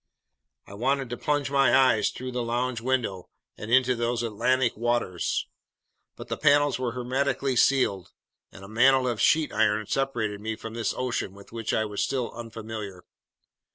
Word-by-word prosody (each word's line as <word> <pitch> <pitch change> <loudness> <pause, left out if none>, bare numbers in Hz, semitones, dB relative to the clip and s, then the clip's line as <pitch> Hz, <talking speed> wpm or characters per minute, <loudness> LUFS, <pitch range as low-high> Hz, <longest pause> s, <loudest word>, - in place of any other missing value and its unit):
I - - -13
wanted 130 +3 -1
to 120 - -3
plunge 145 -2 -1
my 135 -3 +4
eyes 130 -5 +4
through 130 0 -6
the 125 0 -2
lounge 120 0 -2
window 115 -8 -2 0.3
and 105 - -8
into 130 0 +4
these 120 0 -1
Atlantic 120 +3 +1
waters; 120 -6 -1 0.7
but - - -10
the - - -3
panels 145 -2 +3
were 125 -2 -2
hermetically 130 +1 -1
sealed, 120 -8 +2 0.4
and 95 - -13
a - - -9
mantle 130 +4 +4
of 115 -4 -1
sheet 155 -1 +3
iron 110 -1 +2
separated 110 -6 -2
me 110 +1 -3
from 110 0 -8
this 115 -1 -2
ocean 120 -6 -2
with 100 0 -15
which 115 -1 -3
I 110 - +1
was 105 -1 -2
still 130 -3 -2
unfamiliar. 110 -5 -8
120 Hz, 165 wpm, -26 LUFS, 110-130 Hz, 0.7 s, my